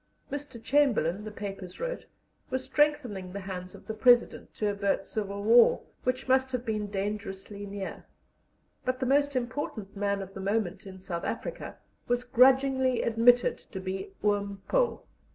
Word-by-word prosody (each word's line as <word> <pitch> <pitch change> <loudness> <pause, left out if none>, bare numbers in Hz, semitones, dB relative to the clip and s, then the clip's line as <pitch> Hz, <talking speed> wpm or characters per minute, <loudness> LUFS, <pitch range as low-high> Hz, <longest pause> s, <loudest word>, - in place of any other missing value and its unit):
Mr. 285 -3 -5
Chamberlain, 225 - +2
the - - -4
papers 195 -3 -7
wrote, - - -4 0.4
was 260 0 -2
strengthening 260 -9 +1
the 200 +2 -5
hands 185 -1 -6
of - - -14
the 220 - -4
President, 240 +2 +3
to 210 - -1
avert 200 -1 0
civil 200 -1 -4
war, 230 +2 +6 0.2
which 255 +1 -1
must 260 0 +3
have 250 -1 -3
been 215 -2 -1
dangerously 200 0 -4
near; 200 -1 -6 0.8
but 255 0 -1
the 260 - 0
most 285 +1 +2
important 240 -5 -3
man 200 0 0
of 195 0 -11
the 195 - -7
moment 200 -1 -1
in 190 -1 -9
South 180 -2 -5
Africa - - -5 0.3
was 245 0 +1
grudgingly 260 +1 +4
admitted 235 +2 +4
to 190 - -9
be 190 +1 -4
"Oom 200 -1 0
Paul." - - +1
215 Hz, 155 wpm, -29 LUFS, 195-255 Hz, 0.8 s, war